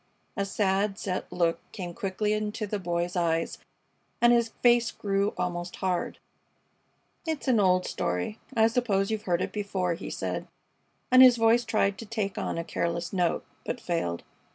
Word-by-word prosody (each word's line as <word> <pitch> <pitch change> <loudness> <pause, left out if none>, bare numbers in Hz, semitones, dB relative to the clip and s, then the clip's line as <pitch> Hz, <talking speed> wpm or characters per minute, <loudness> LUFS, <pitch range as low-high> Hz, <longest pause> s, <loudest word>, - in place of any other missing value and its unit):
A 200 - 0
sad, 195 0 0
set 185 -3 -3
look 170 -1 +1
came 175 -3 -6
quickly 210 0 -1
into 215 0 -2
the 205 0 -3
Boy's 175 0 -2
eyes 165 -2 0 0.6
and 240 0 +6
his 235 -1 +3
face 240 -1 +5
grew 200 0 -1
almost 175 0 -3
hard. 185 -2 -2 1.1
"It's 315 -3 -3
an 245 -4 +4
old 185 -2 +3
story. 90 - -2 0.2
I 220 - +6
suppose 220 -4 +1
you've 215 -1 -3
heard 175 0 +2
it - - -3
before," 195 -4 -1
he 170 - -6
said, - - -3 0.6
and 255 0 +8
his 250 -2 +9
voice 230 +1 +4
tried 215 -4 +1
to 225 - -8
take 205 -3 -2
on - - -2
a 165 - -2
careless 170 +1 -2
note, 180 -3 0 0.2
but 245 - -3
failed. 165 - -2
195 Hz, 165 wpm, -28 LUFS, 175-225 Hz, 1.1 s, his